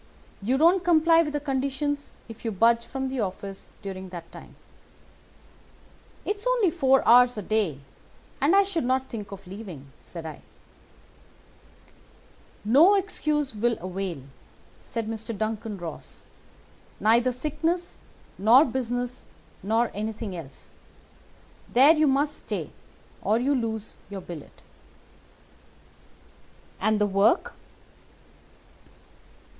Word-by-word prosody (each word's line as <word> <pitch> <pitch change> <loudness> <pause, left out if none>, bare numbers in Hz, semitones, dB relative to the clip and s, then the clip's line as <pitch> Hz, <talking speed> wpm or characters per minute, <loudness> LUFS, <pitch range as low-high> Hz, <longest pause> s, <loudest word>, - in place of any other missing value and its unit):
You 245 +7 +1
don't 340 +5 +4
comply 330 -1 +5
with 300 -2 -2
the 295 - 0
conditions 280 +1 -2 0.2
if 225 -1 -11
you 225 - -1
budge 230 +3 +3
from 265 0 -3
the 260 -1 -3
office 195 -1 -5
during 190 -1 -6
that 170 -2 -9
time.' - - -12 1.7
"'It's 415 +3 -2
only 475 -8 +3
four 270 -6 +3
hours 245 0 +6
a 210 - -4
day, 190 -10 0 0.6
and 300 +7 +4
I 400 - +7
should 385 -6 -2
not 260 +1 0
think 210 -4 -7
of 195 0 -9
leaving,' 180 -8 -9
said 165 -2 -9
I. 155 -2 -8 2.2
"'No 305 - +6
excuse 305 - 0
will 230 +2 0
avail,' 185 -5 -4 0.6
said 230 -2 -4
Mr. 225 0 -5
Duncan 220 -1 -3
Ross; 170 -3 -8 0.7
'neither 235 +4 +3
sickness 310 +7 -2 0.4
nor 235 +9 +7
business 245 0 -3 0.3
nor 225 +4 +1
anything 215 -1 -4
else. 155 -5 -9 1.0
There 270 +6 +7
you 310 -1 +3
must 285 +2 +1
stay, - - -5 0.5
or 215 - +2
you 265 +4 +1
lose 225 -4 -3
your 200 -1 -6
billet.' 170 -5 -11 2.2
"'And 215 +1 +2
the 210 - +3
work? 200 - +2
235 Hz, 115 wpm, -26 LUFS, 205-285 Hz, 2.2 s, I